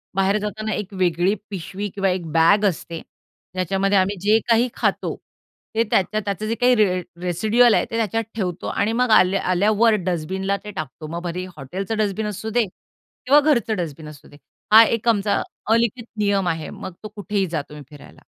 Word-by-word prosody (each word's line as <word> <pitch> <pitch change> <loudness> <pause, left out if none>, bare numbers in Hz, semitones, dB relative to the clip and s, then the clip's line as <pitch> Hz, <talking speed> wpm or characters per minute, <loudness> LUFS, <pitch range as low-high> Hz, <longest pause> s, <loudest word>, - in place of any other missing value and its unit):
बाहेर 195 +2 +2
जाताना 215 +1 -4
एक 205 -1 -5
वेगळी 180 +1 +1 0.2
पिशवी 195 +2 -5
किंवा 195 -1 +1
एक 180 -2 -2
बॅग 170 +6 +4
असते. 165 0 -7 0.5
ज्याच्यामध्ये 195 +2 +1
आम्ही 190 +2 +1
जे 215 +2 +4
काही 230 +2 +4
खातो, - - -1 0.6
ते 230 - +3
त्या - - +5 0.2
त्याचं 205 +1 -4
जे 230 - -1
काही 250 0 +5
रे 190 -5 +2 0.2
रेसिडुअल 215 +7 +3
आहे - - +2
ते 230 - -2
त्याच्यात 225 0 0
ठेवतो 180 -5 -3
आणि 205 +2 0
मग 250 +1 +1
आल्या 190 -1 +4
आल्यावर 215 +5 +3
डस्टबिनला 190 +3 -1
ते 210 - -7
टाकतो. 155 -3 -7
मग 170 +2 -5
भले 180 +1 -4
हॉटेलचं 190 +10 -4
डस्टबिन 210 0 -1
असू 210 +2 -5
दे 235 +1 +2
किंवा 255 +8 -1
घरचं 255 -8 +1
डस्टबिन 160 -3 -5
असू 150 0 -14
दे. 145 - -16 0.3
हा 225 +1 +10
एक 230 +1 -1
आमचा 205 -2 +1 0.3
अलिखित 230 0 +1
नियम 200 -3 +1
आहे. 160 -2 -2
मग 185 - -8
तो 215 - -5
कुठेही 205 -1 -1
जा, 160 -3 -2
तुम्ही 150 -1 -10
फिरायला. 145 -2 -15
200 Hz, 180 wpm, -22 LUFS, 180-215 Hz, 0.6 s, हा